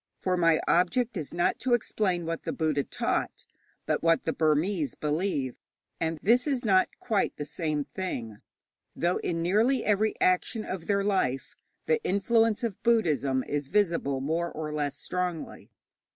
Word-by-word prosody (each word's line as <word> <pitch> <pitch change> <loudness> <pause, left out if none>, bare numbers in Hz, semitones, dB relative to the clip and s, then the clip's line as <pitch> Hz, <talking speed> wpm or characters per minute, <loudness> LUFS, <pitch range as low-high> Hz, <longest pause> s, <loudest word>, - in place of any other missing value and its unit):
For 185 -1 0
my 165 -3 +3
object 220 +8 +2
is 160 -6 -4
not 175 0 0
to 250 -2 +3
explain 190 -6 -1
what 165 0 -3
the - - -3
Buddha 155 -3 0
taught, - - -2 0.4
but - - 0
what 165 0 +2
the - - 0
Burmese 155 - +1
believe; 150 -4 -1 0.5
and 160 0 -1
this 245 +7 +4
is 265 -4 -1
not 190 -3 +4
quite 215 -5 0
the 145 - -4
same 155 -2 -2
thing, 130 - -5 0.6
though 175 +2 +1
in 165 -1 -2
nearly 225 +8 +2
every 215 +1 +1
action 185 +4 +1
of 180 -3 -5
their 200 -1 +2
life 160 -10 0 0.3
the 470 -2 +1
influence 225 +3 +2
of 225 -5 -3
Buddhism 150 - +2
is 145 -1 -3
visible 165 -8 +1
more 165 +5 -1
or 155 -1 -5
less 145 -1 -2
strongly. 180 -1 -4
175 Hz, 155 wpm, -28 LUFS, 150-210 Hz, 0.6 s, this